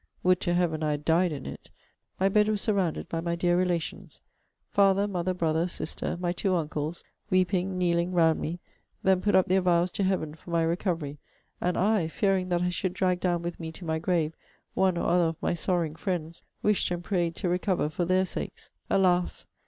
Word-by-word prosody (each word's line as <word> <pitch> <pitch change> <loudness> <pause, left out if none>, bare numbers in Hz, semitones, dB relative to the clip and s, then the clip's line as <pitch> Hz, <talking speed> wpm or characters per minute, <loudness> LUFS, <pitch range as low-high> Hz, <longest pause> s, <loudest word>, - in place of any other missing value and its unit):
[would 180 0 +4
to 175 -2 +1
Heaven 170 -3 +1
I 155 - +1
had 145 0 -2
died 170 +2 +3
in 140 -3 -6
it!] - - -8 0.5
my 190 - +4
bed 210 +2 +3
was 215 -1 0
surrounded 195 -6 0
by 165 - -3
my 170 0 -1
dear 175 0 +2
relations 175 -2 -2 0.5
father, 200 0 +4
mother, 185 -2 -1
brother, 165 0 +1
sister, 175 -1 -3
my 175 -1 0
two 185 +1 0
uncles, 155 0 -3 0.3
weeping, 185 0 +1
kneeling, 175 0 +1
round 165 -3 +3
me, 170 +3 -4 0.4
then 190 -1 +3
put 205 - +2
up 190 - +5
their 190 +1 +3
vows 175 0 +2
to 200 - -1
Heaven 185 -5 0
for 160 - -14
my 170 -1 +2
recovery; 165 -4 -1 0.4
and 180 0 0
I, 205 -3 +2
fearing 190 +1 0
that 175 0 +1
I 180 - +1
should 180 0 -2
drag 180 -2 +1
down 175 -2 0
with 175 0 -4
me 160 -1 -5
to 175 - -8
my 160 -1 -1
grave 160 -2 0 0.4
one 185 -2 +2
or - - -1
other 175 0 +4
of 165 0 -1
my - - 0
sorrowing 170 -2 0
friends, 170 -2 -3 0.2
wished 210 -1 +2
and 175 -1 -3
prayed 175 -3 0
to 190 - -2
recover 180 -1 +1
for 155 +3 -2
their 185 +2 +3
sakes. - - -7 0.2
Alas! 180 -2 +2
175 Hz, 200 wpm, -28 LUFS, 165-185 Hz, 0.5 s, up